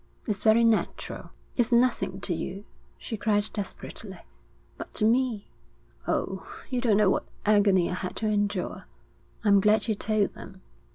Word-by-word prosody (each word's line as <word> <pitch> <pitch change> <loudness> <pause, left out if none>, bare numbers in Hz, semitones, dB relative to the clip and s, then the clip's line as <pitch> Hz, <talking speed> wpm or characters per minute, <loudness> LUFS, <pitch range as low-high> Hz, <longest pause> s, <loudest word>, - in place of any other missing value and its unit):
'It's 205 -3 -2
very 220 +1 +5
natural.' 225 -2 0 0.3
'It's 240 -1 +1
nothing 235 -6 +2
to 180 - +1
you,' 195 +5 -5 0.3
she 225 - -5
cried 205 0 +1
desperately. 200 -1 -6 0.3
' - - -34
But - - -8
to 215 - +1
me.... 235 -2 +1 0.6
Oh, - - -2 0.2
you 250 -1 0
don't 225 -5 +3
know 210 -3 +4
what - - -1 0.2
agony 200 -4 +4
I - - -3
had 180 0 -4
to 220 - -3
endure.' 205 -1 -1 0.6
'I'm 200 -2 +5
glad 210 +3 +3
you 220 - +2
told 210 0 0
them.' 190 0 -12
210 Hz, 160 wpm, -27 LUFS, 195-225 Hz, 0.6 s, very